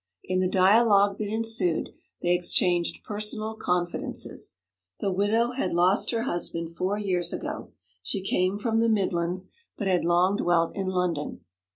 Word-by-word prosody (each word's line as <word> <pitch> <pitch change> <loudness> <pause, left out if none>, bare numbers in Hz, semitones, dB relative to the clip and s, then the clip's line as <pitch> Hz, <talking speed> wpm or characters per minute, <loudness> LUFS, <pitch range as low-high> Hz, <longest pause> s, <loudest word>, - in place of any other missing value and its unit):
In 185 0 -1
the 185 - +2
dialogue 200 +1 +4
that 210 -1 -2
ensued, 220 -6 +1 0.3
they 175 - +3
exchanged 175 0 +1
personal 215 +1 -3
confidences. 180 -4 -2 0.4
The 195 - -1
widow 215 +5 +1
had 255 -7 -2
lost 180 +3 +3
her 230 -1 0
husband 170 -5 -3
four 185 +4 -2
years 180 -4 -1
ago; - - -5 0.3
she 185 - -2
came 185 +1 +1
from 225 +1 0
the 230 0 +3
Midlands, 185 -3 0 0.2
but 205 - -3
had 185 -2 +2
long 175 +4 +3
dwelt 170 -1 +1
in 195 -1 -2
London. 180 -5 -2
185 Hz, 150 wpm, -26 LUFS, 175-210 Hz, 0.4 s, dialogue